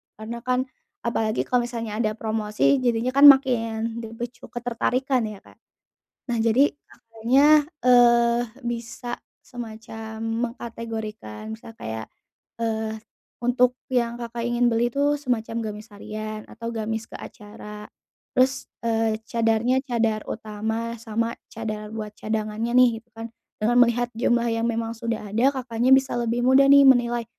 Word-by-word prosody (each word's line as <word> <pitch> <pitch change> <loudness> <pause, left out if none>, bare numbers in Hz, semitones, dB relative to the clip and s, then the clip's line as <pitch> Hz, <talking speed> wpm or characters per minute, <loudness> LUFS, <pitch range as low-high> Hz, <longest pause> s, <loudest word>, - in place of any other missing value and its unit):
karena 225 +2 -7
kan 255 +1 0 0.4
apalagi 225 -2 0
kalau 245 -1 0
misalnya 230 -3 -5
ada 215 -2 0
promosi 220 +4 +1
jadinya 245 0 0
kan 280 +2 +8
makin 230 -4 +4
dipicu 235 +2 -7
ketertarikan 245 +1 -1
ya 210 -2 -9
Kak, - - -20 0.7
nah 240 - 0
jadi 230 +5 +4 0.2
Kakaknya, 260 +7 +3 0.2
eee, 240 -1 +5 0.3
bisa 240 +1 -5 0.2
semacam 220 -2 -8 0.3
mengkategorikan 220 - -7
misal 225 - -12
kayak, 110 - -7 0.5
eee, 220 -1 -2 0.4
untuk 245 +1 +2 0.2
yang 235 -2 +1
Kakak 235 0 -5
ingin 240 0 +2
beli 235 +1 +2
itu 285 +3 +1
semacam 230 -4 -2
gamis 210 +2 -10
harian, 215 +1 -6
atau 230 0 -6
gamis 225 0 -3
ke - - -16
acara, 210 -1 -10 0.5
terus, 260 +1 +2 0.2
eee, 225 -1 0
cadarnya 230 +2 +2
cadar 225 -4 0
utama 220 +2 -4
sama 230 +1 -2 0.2
cadar 215 -1 -5
buat 215 -1 -6
cadangannya 220 +2 -2
nih 250 0 +7
gitu 240 - -41
kan, 225 +1 -7 0.3
dengan 235 +3 +2
melihat 240 +1 0
jumlah 240 0 +2
yang 230 0 -1
memang 230 0 -2
sudah 225 -2 -4
ada 240 +7 +3
Kakaknya 250 -1 0
bisa 265 -1 +4
lebih 235 0 0
mudah 265 +2 +6
nih 280 -1 +8
menilai, 240 -2 +3
230 Hz, 135 wpm, -24 LUFS, 220-245 Hz, 0.7 s, kan